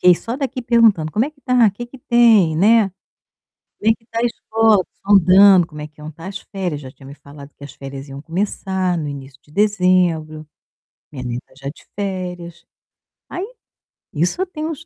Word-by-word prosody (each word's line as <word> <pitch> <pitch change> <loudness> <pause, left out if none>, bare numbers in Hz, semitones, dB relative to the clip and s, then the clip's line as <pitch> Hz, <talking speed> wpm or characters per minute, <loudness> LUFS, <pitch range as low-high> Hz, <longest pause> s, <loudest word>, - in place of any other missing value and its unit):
Fiquei 180 -1 +6
só 230 +7 -5
daqui 265 -2 -3
perguntando: 225 -10 +3
"Como 220 +4 +2
é 295 - -5
que 300 -2 -31
está? 250 -4 +3
Que 240 +5 -8
que 255 +2 -14
tem, 225 -10 +4
né? 210 +2 +4 0.9
Como 220 +2 +3
é - - +3
que 225 - -19
está 230 0 -5
a 235 - +1
escola?" 220 -3 +2 0.2
Sondando, 190 -1 +6
como 150 -2 -10
é 150 - -6
que 150 0 -26
iam 155 - -7
estar 165 +3 -11
as 195 0 -6
férias, 180 -7 -5
já 130 - -10
tinha 135 0 -16
me 140 - -10
falado 140 0 -14
que - - -13
as 140 - -10
férias 135 0 -9
iam 135 +1 -8
começar 185 +1 -2
no 155 -3 -3
início 135 -1 -9
de 150 - -23
dezembro. 180 -6 +1 0.6
Minha 130 -4 -7
neta, 125 +1 -6
já 135 0 -6
de 145 - -13
férias. 180 -3 -5 0.6
Aí 365 +3 -5 0.7
isso 175 - 0
eu 375 - +1
tenho 315 -3 -5
uns 330 +1 -7
185 Hz, 200 wpm, -19 LUFS, 150-225 Hz, 0.9 s, Fiquei